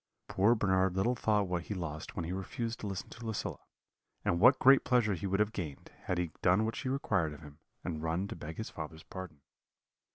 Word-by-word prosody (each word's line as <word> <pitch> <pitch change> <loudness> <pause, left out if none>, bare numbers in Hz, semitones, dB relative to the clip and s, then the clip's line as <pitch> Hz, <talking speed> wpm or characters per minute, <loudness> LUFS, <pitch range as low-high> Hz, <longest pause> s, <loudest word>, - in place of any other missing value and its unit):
"Poor 105 +5 +4
Bernard 95 -3 +2
little 115 +6 +2
thought 105 -4 +1
what 90 -1 -2
he 105 - -4
lost 80 -4 -5
when 85 - -2
he 85 - -4
refused 115 +5 -3
to 105 - -4
listen 95 -2 -4
to 120 - -10
Lucilla, 110 -3 -3 0.7
and 85 - +2
what 130 +7 +7
great 135 +1 +7
pleasure 120 -5 +3
he 95 +2 -3
would 95 +1 0
have 105 +1 +2
gained, 80 -10 -6
had 90 - 0
he 85 -2 -1
done 95 +4 +4
what 115 - -2
she 130 - -3
required 100 - 0
of 75 - -11
him, 75 0 -12 0.2
and 80 -3 -3
run 85 +4 -1
to - - -6
beg 80 -1 -7
his 110 - -5
father's 80 0 -7
pardon. 90 -6 -8
95 Hz, 220 wpm, -32 LUFS, 85-110 Hz, 0.7 s, what